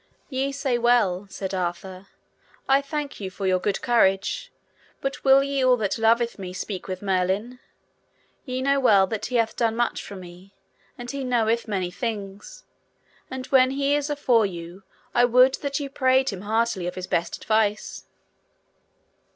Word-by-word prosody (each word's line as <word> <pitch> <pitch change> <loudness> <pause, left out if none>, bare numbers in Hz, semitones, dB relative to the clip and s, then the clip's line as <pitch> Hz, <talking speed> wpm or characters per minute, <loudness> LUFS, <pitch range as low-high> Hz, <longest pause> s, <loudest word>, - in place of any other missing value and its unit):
Ye 270 0 -1
say 270 -3 -1
well, 215 -6 +2
said 195 0 -5
Arthur; 185 +1 -4 0.6
I 275 +1 +4
thank 290 0 -5
you 195 -2 -4
for 195 +1 -6
your 185 -1 +2
good 200 +2 -2
courage, 230 - +1 0.5
but 275 0 -4
will 270 0 +6
ye 275 -1 -1
all 255 -1 +5
that 215 0 -2
loveth 230 0 +2
me 185 -2 -6
speak 190 0 -5
with 185 +1 -5
Merlin? 195 +6 -1 0.8
ye 255 -1 -3
know 275 +1 +2
well 205 -7 +5
that 215 +2 -4
he 250 - -4
hath 230 -2 +1
done 225 -2 0
much 240 0 0
for 200 - -9
me, 185 +1 -12 0.4
and 245 0 -6
he 280 -1 -4
knoweth 235 -2 +1
many 190 -4 -2
things, 210 - -6 0.7
and 260 0 -6
when 255 -1 +6
he 275 +1 0
is 290 0 0
afore 250 -7 +2
you, 175 +1 -9 0.3
I 245 - +4
would 250 +2 +5
that 280 0 -2
ye 285 - -4
prayed 260 -1 +2
him 190 -2 -7
heartily 220 -3 0
of 180 - -5
his 185 - -5
best 170 - -1
advice. 215 -1 -1
230 Hz, 165 wpm, -24 LUFS, 195-260 Hz, 0.8 s, will